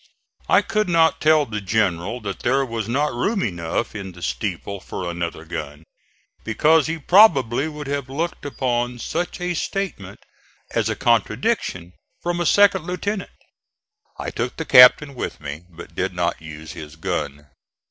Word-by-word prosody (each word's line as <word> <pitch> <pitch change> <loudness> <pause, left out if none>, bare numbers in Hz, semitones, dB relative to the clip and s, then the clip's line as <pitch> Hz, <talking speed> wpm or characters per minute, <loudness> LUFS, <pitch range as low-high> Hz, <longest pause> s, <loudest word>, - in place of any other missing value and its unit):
I - - +5
could 215 -3 0
not 165 -2 +3
tell 155 -1 +4
the 105 -3 -5
General 100 +2 0
that 100 -2 -5
there 135 +3 +1
was 115 -3 -4
not 145 +3 0
room 195 - 0
enough 85 +2 -2
in 100 -3 -7
the 90 0 -11
steeple 100 -1 -3
for 90 0 -6
another 85 -1 -4
gun, 75 +2 -6 0.6
because 150 +7 +3
he 165 +1 -2
probably 145 - +5
would 150 -1 -7
have 140 -1 -3
looked 165 +6 -3
upon 125 -3 -1
such 170 +10 -3
a 180 0 -1
statement 160 - -4 0.5
as - - 0
a - - -1
contradiction 90 0 0 0.3
from 175 0 -2
a 175 - +1
second 200 -4 +4
lieutenant. 195 +3 -3 0.9
I - - -4
took - - -3
the - - -3
captain 135 +3 +7
with 125 - -5
me, 75 +3 -7
but 85 -1 -12
did 90 +2 -2
not 85 -1 -1
use 80 0 -9
his 75 0 -9
gun. 75 -2 -4
120 Hz, 160 wpm, -22 LUFS, -, 0.9 s, captain